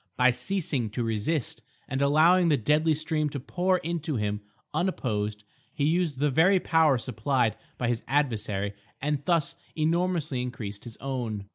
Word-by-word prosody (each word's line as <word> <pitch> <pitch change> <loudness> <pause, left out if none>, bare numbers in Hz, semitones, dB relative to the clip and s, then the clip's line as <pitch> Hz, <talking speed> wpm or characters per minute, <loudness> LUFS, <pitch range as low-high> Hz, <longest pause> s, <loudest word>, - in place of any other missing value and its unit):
By 125 0 +5
ceasing 145 - 0
to 120 - +1
resist, 115 +6 -1 0.3
and 135 +1 -2
allowing 165 +6 +5
the 150 -3 +4
deadly 150 +6 +2
stream 155 0 -1
to 140 - -5
pour 180 +7 +1
into 165 -3 -3
him 105 -2 -1 0.3
unopposed, 105 - -1 0.3
he 140 - -3
used 165 -2 +1
the 145 +1 +1
very 180 +7 +5
power 160 -6 +3
supplied 120 -1 0 0.2
by 125 - -1
his 115 -1 0
adversary 105 -7 0 0.3
and 145 0 -1
thus 170 0 +1 0.2
enormously 160 -4 0
increased 110 -5 -6
his 115 -2 -9
own. 120 -6 -4
140 Hz, 150 wpm, -27 LUFS, 115-160 Hz, 0.3 s, By